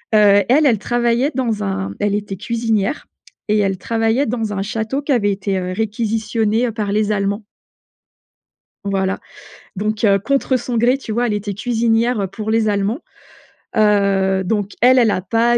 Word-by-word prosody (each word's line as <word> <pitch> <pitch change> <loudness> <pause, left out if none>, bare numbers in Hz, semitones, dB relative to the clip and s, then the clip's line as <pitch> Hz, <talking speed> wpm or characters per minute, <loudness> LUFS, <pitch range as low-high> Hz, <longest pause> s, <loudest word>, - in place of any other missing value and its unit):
Heu, 205 -1 +6
elle, 295 +5 +4
elle 230 -7 +3
travaillait 240 +5 +1
dans 230 -5 -1
un 195 -1 -3
elle 205 0 +1
était 205 -2 -4
cuisinière, 225 +2 -1 0.4
et 210 - +3
elle 195 -2 0
travaillait 225 +7 0
dans 220 -2 -2
un 195 - -2
château 220 +6 -2
qui 285 0 -3
avait 205 -5 +2
été 195 -1 -2
réquisitionné, 220 +3 -1
heu, - - -2
par 210 -2 -3
les 215 0 +1
Allemands. 200 +1 -1 1.4
Voilà. 195 -1 -1 0.6
Donc, 210 +2 -2
heu, 200 -1 +5
contre 265 +4 0
son 240 0 -3
gré 245 +4 +3
tu 220 - -6
vois 240 +2 +1
elle - - -1
était 205 -1 -3
cuisinière, 230 +1 +1
heu, 195 - 0
pour 215 +3 -5
les 220 -1 +2
Allemands. 205 - 0 0.8
Heu, 195 -2 +2
donc 205 +1 -2
elle 255 +1 +6
elle 225 -3 +4
a 185 - -1
pas 230 +5 +2
215 Hz, 170 wpm, -18 LUFS, 200-235 Hz, 1.4 s, Heu